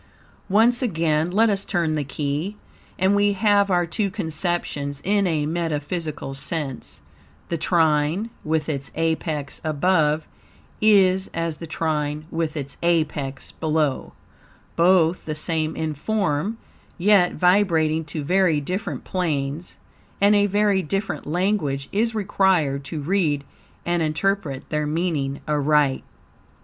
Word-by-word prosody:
Once 230 +5 +4
again 165 -7 +1
let 215 +5 +3
us 200 -2 +1
turn 170 -5 0
the 150 -1 -1
key, 150 +8 -3 0.4
and 190 +2 +3
we 205 0 +3
have 205 0 +3
our 175 -2 +2
two 200 +5 -1
conceptions 160 -6 -2
in 200 0 +2
a 155 -4 0
metaphysical 155 -2 -3
sense; 135 -1 -4 0.5
the 170 - -1
trine 160 +5 +1
with 155 -1 0
its 140 -3 -3
apex 160 -3 -2
above 155 0 +1 0.6
is 190 -3 +4
as 165 -2 -2
the 165 - -8
trine 150 -2 -2
with 165 -1 -2
its 140 -1 -5
apex 155 -5 -1
below, 155 -3 -1 0.6
both 175 0 +3
the 155 - -3
same 155 0 -1
in 160 -1 -2
form, 195 +3 -1 0.4
yet 185 -1 +4
vibrating 170 -4 +3
to 150 0 -5
very 180 -1 +3
different 185 +8 -4
planes, 155 -3 -3 0.4
and 200 +1 +5
a 205 0 +4
very 205 -1 +2
different 195 +3 -3
language 155 -5 0
is 225 +3 0
required 185 -9 +1
to 155 +2 -5
read 155 -3 +1 0.4
and 175 0 0
interpret 155 -2 -1
their 150 -1 0
meaning 150 -4 -1
aright. 150 -2 +2
165 Hz, 125 wpm, -23 LUFS, 150-190 Hz, 0.6 s, and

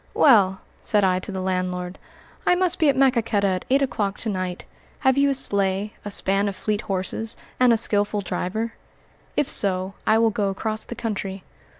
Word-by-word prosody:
"Well," 195 -8 +5 0.2
said 210 -1 +2
I 185 -1 +3
to 195 - -7
the 190 -1 -4
landlord, 185 -1 -2 0.4
"I 360 - +4
must 365 -1 0
be 315 -3 +4
at 275 - +3
Maquoketa 235 -6 +2
at 185 -1 -1
eight 275 +2 +3
o'clock 205 -7 -2
to 225 - -2
night; 185 -2 -4 0.4
have 265 -2 +3
you 280 0 +3
a 275 - +2
sleigh, 200 -3 0
a 205 - -5
span 200 0 +1
of 200 - -3
fleet 210 +2 -2
horses, 195 +4 -3 0.2
and 250 -1 +5
a 230 - +4
skillful 205 -1 +1
driver? 215 +4 -3 0.6
If 295 - +2
so, 190 -1 +1
I 220 - +5
will 225 0 +3
go 205 -2 0
across 215 +2 -3
the 240 - -7
country." 195 -4 -4
205 Hz, 190 wpm, -23 LUFS, 190-230 Hz, 0.6 s, Well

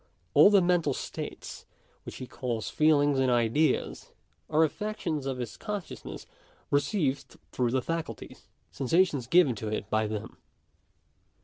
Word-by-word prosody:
All - - +8
the 200 -3 +5
mental 175 -1 +2
states - - -7 0.4
which - - -7
he 130 - -7
calls 120 -4 -4
feelings 145 -3 +3
and 130 -1 +2
ideas, 120 +6 +1 0.4
are 155 +1 +4
affections 160 -5 -2
of 135 -1 -2
his 120 -3 -6
consciousness 205 -5 -6 0.5
received 145 -1 0
through 125 -2 0
the 130 +1 0
faculties 165 -1 -5
— - - -43
sensations 145 -2 +1
given 170 -3 +5
to 110 - -5
it 105 -1 -3
by 110 0 +1
them. 105 -1 -6
145 Hz, 135 wpm, -28 LUFS, 125-165 Hz, 0.5 s, All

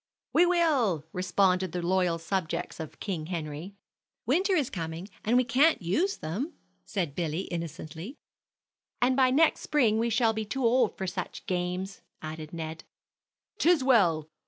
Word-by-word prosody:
"We 350 +2 +5
will!" 275 - +2
responded 185 -1 +1
the 180 - -2
loyal 180 -2 +2
subjects 170 0 -3
of 160 -1 -7
King 170 -7 -3
Henry. 165 +2 -5 0.5
"Winter 370 - +2
is 290 -7 0
coming, 165 0 -5 0.2
and 235 +3 +3
we 255 - +5
can't 270 +7 +4
use 315 - 0
them," 220 - -4 0.3
said 180 -9 -2
Billy, 165 +1 -2
innocently. 165 - -6 0.8
"And 255 +1 +3
by 260 -1 +4
next 305 +5 +3
spring 230 -8 +2
we 235 +1 +1
shall 230 -1 +3
be 220 0 -2
too 255 +4 -2
old 240 -1 +3
for 190 - -3
such 185 0 -5
games," 180 +1 -3 0.2
added 155 0 -7
Ned. 160 -1 -6 0.8
"'Tis 330 -4 +4
well! 175 - +3
190 Hz, 150 wpm, -28 LUFS, 165-255 Hz, 0.8 s, We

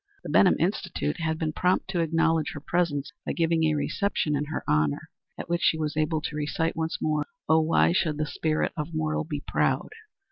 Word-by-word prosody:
The - - -5
Benham - - +5
Institute 75 +1 -1
had 160 -1 -1
been 155 -1 -2
prompt 180 +3 +1
to 180 - -1
acknowledge 165 -1 +1
her - - -6
presence 150 -3 -1
by - - -2
giving 165 -1 +2
a 155 -1 +2
reception 150 0 0
in 145 +1 -1
her 155 - -4
honor, 75 -1 0 0.3
at - - -6
which 170 +1 0
she 160 - +3
was 155 -1 -2
able 155 0 0
to 150 - -4
recite 160 +3 -1
once 160 0 -2
more, 150 -1 0 0.2
"Oh, 160 +1 +5
why 160 +1 +3
should 160 -4 +1
the 155 - 0
Spirit 155 +1 -1
of 155 +1 -4
Mortal 155 0 -1
be 150 -2 -5
proud?" - - +1
155 Hz, 205 wpm, -27 LUFS, 150-165 Hz, 0.3 s, Benham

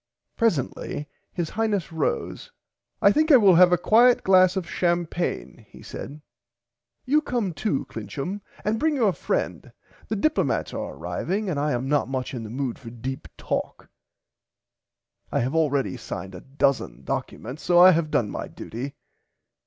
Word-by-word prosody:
Presently 150 - -1 0.2
his 170 -3 -3
Highness 210 -5 -1
rose 160 - -2 0.5
I - - +7
think 310 +1 +3
I 275 - +10
will 200 -5 +6
have 180 +1 +7
a 180 - +5
quiet 235 +7 +5
glass 185 -1 +5
of 185 -3 -2
champaigne 175 -1 -2
he - - -14
said 150 +2 -8 0.8
you 295 +4 +3
come 235 - -2
too 155 -1 -1
Clincham 145 - -5 0.2
and 215 +2 0
bring 315 +2 +1
your 220 -8 +2
friend - - -3 0.4
the 220 - -2
Diplomats 310 +10 0
are - - -5
arriving 200 +1 -2
and 145 - -1
I 150 +1 0
am 125 +2 -2
not 145 -1 +1
much 130 -1 -3
in 125 - -4
the 110 - -7
mood 130 +1 -3
for 115 - -9
deep 125 +3 -6
talk - - -4 1.4
I - - +1
have 130 +4 -1
already 145 -5 +1
signed 95 -4 -7
a 90 - -9
dozen 135 - -1
documents 125 - -5
so 175 -1 +2
I 180 +1 +9
have 165 -2 +1
done 110 -8 0
my - - -5
duty. 135 +5 -7
170 Hz, 160 wpm, -25 LUFS, 135-205 Hz, 1.4 s, I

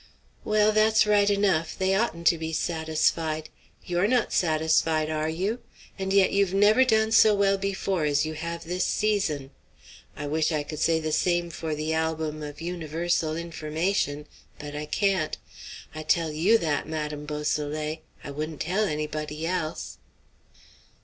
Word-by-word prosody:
"Well, 215 0 +3
that's 215 0 +4
right 205 -1 +4
enough; 195 -6 +1
they 190 0 +1
oughtn't 195 -5 -1
to 170 -1 +4
be 160 0 -4
satisfied. 160 -1 0 0.4
You're 175 +2 +1
not 245 0 +1
satisfied, 160 -1 +2
are 155 0 -1
you? 195 +9 -2 0.4
And 190 0 -2
yet 195 -1 +4
you've 195 -1 +1
never 210 +6 +5
done 220 -3 +2
so 220 -1 +6
well 200 -1 +3
before 195 -3 -1
as 145 +1 +2
you 155 - -4
have 170 +2 -5
this 180 +2 -2
season. 180 -11 0 0.7
I 145 - -4
wish 155 +3 0
I 150 -2 0
could 150 +1 -7
say 160 0 +2
the 155 -1 -3
same 175 +1 +1
for 160 -1 -4
the 155 +1 -2
'Album 160 -1 -2
of 150 +1 -7
Universal 165 -1 -1
Information;' 160 -1 -2 0.3
but 145 0 -8
I 150 0 -5
can't. 190 -2 0 0.6
I 155 - -6
tell 165 0 +1
you 175 +10 +4
that, 155 -9 -1
Madame 150 -1 -4
Beausoleil; 150 +1 -2 0.2
I 140 - -6
wouldn't 155 +1 -5
tell 190 +6 +1
anybody 150 -1 -3
else." 170 -3 -3
160 Hz, 155 wpm, -26 LUFS, 155-195 Hz, 0.7 s, so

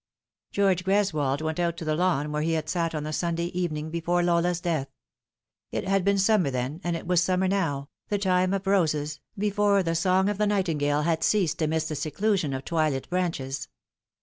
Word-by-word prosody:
George 195 -3 +2
Greswold' 155 -8 +1
went 160 +1 -2
out 170 -1 0
to 165 - -6
the 155 - +1
lawn 155 -3 +1
where 150 0 -1
he 165 +1 0
had 155 -1 -1
sat 165 -1 -1
on 150 - -2
the 155 +1 -4
Sunday 170 +1 -1
evening 160 -3 -3
before 170 +1 0
Lola's 175 0 +2
death. 165 -6 -1 0.8
It - - -3
had 195 -1 +2
been 200 +1 +2
summer 195 -5 +3
then, 130 +6 -3
and 175 -1 -1
it - - -6
was 180 -1 +3
summer 185 +1 +1
now 165 -8 -1 0.2
the 205 - 0
time 185 -2 +2
of 195 0 -2
roses, 155 -6 +1 0.2
before 205 -1 +2
tho 165 -1 0
song 185 +3 +2
of 205 0 -1
the 210 - +3
nightingale 150 -7 +1
had 160 0 0
ceased 185 -6 +1
amidst.the 160 0 0
seclusion 170 +2 0
of 135 0 -4
twilit 155 -5 0
branches. 165 -7 -2
170 Hz, 190 wpm, -26 LUFS, 155-190 Hz, 0.8 s, summer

